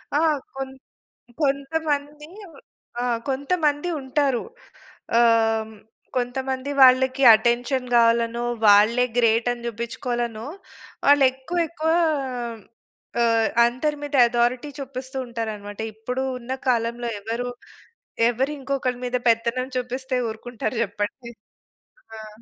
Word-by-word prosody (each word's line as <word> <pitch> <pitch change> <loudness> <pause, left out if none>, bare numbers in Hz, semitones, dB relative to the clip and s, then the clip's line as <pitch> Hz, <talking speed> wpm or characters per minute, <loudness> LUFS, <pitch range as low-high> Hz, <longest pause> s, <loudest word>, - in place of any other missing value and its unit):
ఆ! - - +4 0.4
కొంత్ 265 0 -6 0.6
కొంతమంది 290 +1 -1 0.7
ఆ! - - -1 0.3
కొంతమంది 290 +3 0
ఉంటారు. 265 -1 0 0.7
ఆహ్, 235 0 +6 0.4
హ్మ్, 220 - -13 0.4
కొంతమంది 260 +2 -2
వాళ్ళకి 260 +1 +5
అటెన్షన్ 245 +3 0
గావాలనో, 235 0 +3 0.2
వాళ్ళే 215 +5 +6
గ్రేట్ 230 0 +3
అని 240 -1 -6
చూపించుకోవాలనో, 235 0 -4 0.6
వాళ్ళు 285 0 +6
ఎక్కువ 265 +7 -6
ఎక్కువ 320 0 -1 1.3
ఆహ్, 230 -1 +3 0.2
అందరి 260 +5 -1
మీద 290 0 -3
అథారిటీ 240 +3 0
చూపిస్తూ 265 -1 -7
ఉంటారన్నమాట. 215 -3 -6
ఇప్పుడు 250 +4 -4 0.2
ఉన్న 245 +1 -8 0.2
కాలంలో 235 0 0
ఎవరు, 230 +4 -3 0.8
ఎవరు 260 +4 -1
ఇంకొకరి 265 -2 -2
మీద 250 0 0
పెత్తనం 235 +3 0
చూపిస్తే 255 +1 -3
ఊరుకుంటారు 235 +2 -5
చెప్పండి. 210 +4 -5 0.8
ఆ! 220 0 -9
250 Hz, 100 wpm, -23 LUFS, 235-270 Hz, 1.3 s, ఆహ్